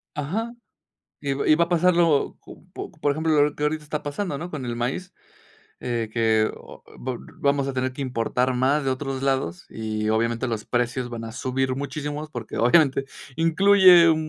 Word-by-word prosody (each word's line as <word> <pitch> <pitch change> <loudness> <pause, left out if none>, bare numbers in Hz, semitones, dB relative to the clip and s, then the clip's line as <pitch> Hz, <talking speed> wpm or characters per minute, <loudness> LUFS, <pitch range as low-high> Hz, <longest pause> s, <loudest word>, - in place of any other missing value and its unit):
Ajá. 200 +11 -3 0.7
Y 140 -1 -2
va 135 - -1
y - - +7
va 170 +2 +3
a - - -12
pasarlo, 170 -3 +3
co - - -14
po - - -7
por 150 -4 0
ejemplo, 155 -1 +2
lo 145 0 +1
que 150 - -5
ahorita 155 +1 0
está 150 0 -4
pasando, 145 +2 -3
¿no?, 175 +3 -6
con 145 -6 -5
el 120 -1 -3
maíz, 130 +10 -3 0.7
eh, 115 -2 -2
que 110 -2 +2
o - - -14
vol 125 -1 -5
vamos 140 -1 +2
a 135 - -2
tener 130 0 -1
que 130 - -9
importar 125 0 0
más 135 +4 +2
de 135 - +1
otros 135 0 -3
lados 130 -11 -1
y, 110 -1 -3
obviamente, 115 +3 0
los 115 -3 -3
precios 125 +1 -1
van 115 -1 -6
a 115 - -7
subir 130 +2 -1
muchísimos, 150 +2 -5
porque, 120 -6 -6
obviamente, 135 +2 +4 0.3
incluye 180 +2 +6
m 165 -1 +5
135 Hz, 190 wpm, -24 LUFS, 120-155 Hz, 0.7 s, y